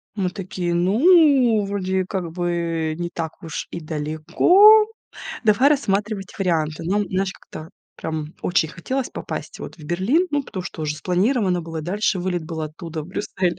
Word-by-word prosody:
Мы 190 -3 0
такие, 180 -2 -4
ну, 250 - +4
вроде 190 -1 -1
как 180 -3 -4
бы 170 -2 -1
не 175 0 -3
так 160 -2 -4
уж 160 - -5
и 170 - -5
далеко, 170 - +5 0.6
давай 225 +6 +5
рассматривать 205 -7 -1
варианты. 165 -5 0
Но, 195 +4 +1
м, 205 - -1
знаешь, 190 +1 -1
как-то 155 +1 -11 0.3
прям 155 0 -5
очень 175 -3 +1
хотелось 255 - -3
попасть - - -6
вот - - -8
в 155 - -13
Берлин, 205 - +1
ну, 290 -1 0
потому 185 -8 -6
что 165 -3 -6
уже 150 0 -2
спланировано 185 - +1
было, 165 -1 -6
дальше 195 +3 0
вылет 175 -2 -2
был 160 0 -5
оттуда 160 +1 -6
в 150 - -10
Брюссель. 185 -2 -2
180 Hz, 165 wpm, -22 LUFS, 165-210 Hz, 0.6 s, далеко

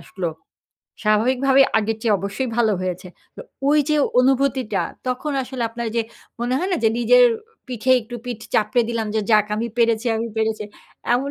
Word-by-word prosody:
আসল, 190 - -12 0.8
স্বাভাবিকভাবে 255 +6 +3 0.2
আগের 220 +1 -1
চেয়ে 215 -3 +3
অবশ্যই 200 +7 -3
ভালো 225 -3 +3
হয়েছে। 185 0 -4 0.3
তো - - -8 0.3
ঐযে 300 0 +3 0.2
অনুভূতিটা, 260 -5 +1 0.3
তখন 255 +4 -2
আসলে 255 -1 -5
আপনার 235 0 -5
যে 230 - +2 0.4
মনে 245 +2 0
হয় 370 +4 -2
না? 355 - +2
যে - - +6
নিজের - - +6 0.4
পিঠে 255 0 0
একটু 235 +2 -10
পিঠ 240 -3 -5
চাপড়ে 220 +3 +2
দিলাম 230 -2 -2
যে, 220 - +2
"যাক 210 -1 +5
আমি 230 - -1
পেরেছি, 230 0 +2
আমি 230 +1 -3
পেরেছি।" 220 -1 -1 0.5
এমন 275 +3 -1
235 Hz, 165 wpm, -21 LUFS, 215-260 Hz, 0.8 s, যে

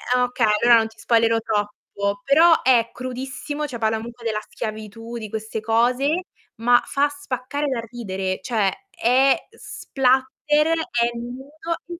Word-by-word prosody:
Ehm, 250 - +3
okay, 245 -2 +1 0.2
allora 240 -1 +7
non 220 - 0
ti 225 0 -19
spoilero 230 0 +3
troppo, 205 -1 -3
però 320 +4 +5
è 235 -3 +4
crudissimo, 265 +4 -5
cioè 245 -4 -6
palla 220 0 0
comunque 235 +1 -9
della 215 -1 0
schiavitù, 220 +1 -6
di 215 -2 -6
queste 220 0 -4
cose, 250 +10 +1 0.3
ma 245 +2 +4
fa 285 +1 +1
spaccare 285 0 -4
dal 245 -4 -2
ridere, 190 -5 -3
cioè 210 -6 +1 0.3
è 265 +3 +4 0.2
splatter, 270 +3 0
è 240 -6 0
nudo 305 +8 -6
240 Hz, 140 wpm, -22 LUFS, 225-270 Hz, 0.3 s, allora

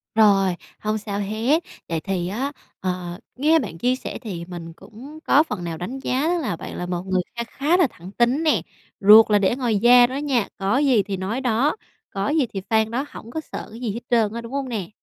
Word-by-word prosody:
Rồi, 195 -4 +4 0.2
hông 215 0 -1
sao 205 -1 -4
hết. 225 - 0 0.3
Vậy 165 -1 -1
thì 180 0 -2
á, 250 +9 -2 0.3
ờ, 180 -1 -3 0.2
nghe 310 +5 +4
bạn 200 - -5
chia 250 +8 +1
sẻ 255 - -6
thì 180 -7 -6
mình 170 -2 -8
cũng 260 - -12
có 295 - +5
phần 210 - -5
nào 165 -1 -4
đánh 230 +11 -5
giá 265 +2 0
là 335 - 0
bạn - - -8
là 180 - -3
một 175 0 -3
người 185 -1 +1
kha 235 - -2
khá 290 +8 0
là 360 -5 +4
thẳng 180 -2 -12
tính 240 +8 +1
nè, 315 - +3 0.4
ruột 215 +2 +8
là 205 - +5
để 200 +3 +2
ngoài 240 -5 0
da 245 +2 +7
đó 255 - -6
nha, 275 -7 0
có 195 +5 +1
gì 265 -7 +3
thì 195 0 -4
nói 200 +7 -3
đó, 250 +3 +1 0.3
có 195 +1 -2
gì 300 -3 +2
thì 195 - -3
phang 220 0 +2
đó, 260 +5 -1
hổng 230 - -11
có 315 - -3
sợ - - -8
cái 225 - -10
gì 240 -4 -2
hết 230 - -4
trơn 225 -4 +2
á, 235 - -4
đúng 230 +1 -10
hông 275 -2 -2
nè? 205 -7 -4
220 Hz, 235 wpm, -23 LUFS, 195-260 Hz, 0.4 s, ruột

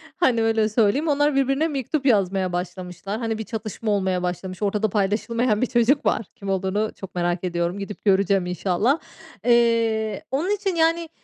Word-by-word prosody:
hani, 240 -9 +2
öyle 220 -1 +2
söyleyeyim; 230 +8 +2
onlar 290 -1 +2
birbirine 275 +3 +2
mektup 280 -1 -2
yazmaya 195 -5 +2
başlamışlar. 180 +3 -5
Hani, 225 -2 -2
bir 220 - -4
çatışma 220 -1 -4
olmaya 190 -3 0
başlamış. 180 +1 -4
Ortada 210 +1 +1
paylaşılmayan 215 +3 0
bir 255 - +2
çocuk 240 +5 +2
var. 220 - +1
Kim 200 -1 -7
olduğunu 195 +3 0
çok 195 - -10
merak 175 0 -1
ediyorum. 175 +1 -1
Gidip 200 +2 -7
göreceğim 195 -1 +3
inşallah. 185 - 0 0.5
Eee, 230 -2 +2
onun 310 +8 0
için 390 -3 -2
yani 330 0 +2
215 Hz, 160 wpm, -23 LUFS, 190-250 Hz, 0.5 s, göreceğim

